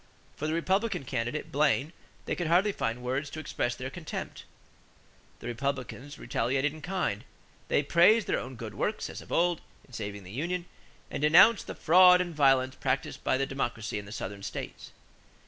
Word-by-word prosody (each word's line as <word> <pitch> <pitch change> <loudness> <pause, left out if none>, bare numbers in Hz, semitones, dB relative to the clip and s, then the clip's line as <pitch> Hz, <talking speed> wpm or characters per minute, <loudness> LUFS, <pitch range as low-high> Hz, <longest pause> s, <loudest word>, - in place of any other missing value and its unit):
For 155 - -3
the 155 - -1
Republican 190 +1 0
candidate, 125 +3 -3
Blaine, 145 +2 +2 0.3
they - - -1
could 175 - -2
hardly 180 +5 +4
find 125 -8 -3
words 130 +4 -2
to 155 - -7
express 120 -5 -2
their 130 +2 -6
contempt. 165 0 -6 1.0
The - - -10
Republicans 135 +2 -4
retaliated 135 +5 0
in 155 - -11
kind. 180 - -2 0.4
They 145 - +2
praised 180 +8 +5
their - - 0
own 130 +1 -7
good 115 -2 -7
works, 215 - -2
as - - -8
of - - -14
old, 175 -1 +2 0.2
in 130 - -21
saving 100 -3 -5
the 90 - -11
union, 170 - -2 0.5
and - - -4
denounced 180 +9 +6
the - - -6
"fraud 180 +2 +7
and 175 -2 -2
violence 135 -3 +3
practiced 130 -1 -2
by 130 - +2
the 135 - 0
Democracy 120 -6 -3
in 105 - -9
the - - -10
Southern 100 -2 -6
states." - - -6
140 Hz, 180 wpm, -29 LUFS, 125-175 Hz, 1.0 s, fraud